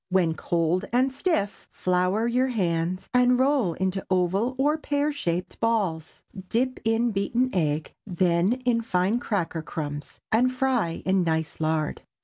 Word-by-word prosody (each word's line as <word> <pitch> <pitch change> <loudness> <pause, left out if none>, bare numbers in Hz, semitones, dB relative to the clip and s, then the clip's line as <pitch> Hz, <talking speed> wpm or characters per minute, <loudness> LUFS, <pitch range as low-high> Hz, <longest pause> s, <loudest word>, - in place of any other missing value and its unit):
When 180 -3 +2
cold 170 +3 0
and 255 +2 +2
stiff, 265 - -1
flour 185 +4 0
your 250 +2 +2
hands 180 -5 -1
and 250 0 +4
roll 260 - +2
into 190 +2 -2
oval 190 +7 +1
or 290 +3 +2
pear 290 0 0
shaped 180 - -3
balls; 195 -9 -1 0.3
dip 255 +3 0
in 225 +1 +2
beaten 235 +6 0
egg, 155 -4 -1
then 180 +2 +2
in 235 -2 +2
fine 195 +2 +1
cracker 180 -8 -2
crumbs, 145 -2 -6
and 245 +3 +3
fry 255 -10 0
in 190 0 +3
nice 160 -2 -1
lard. 155 -1 -1
195 Hz, 140 wpm, -26 LUFS, 170-245 Hz, 0.3 s, and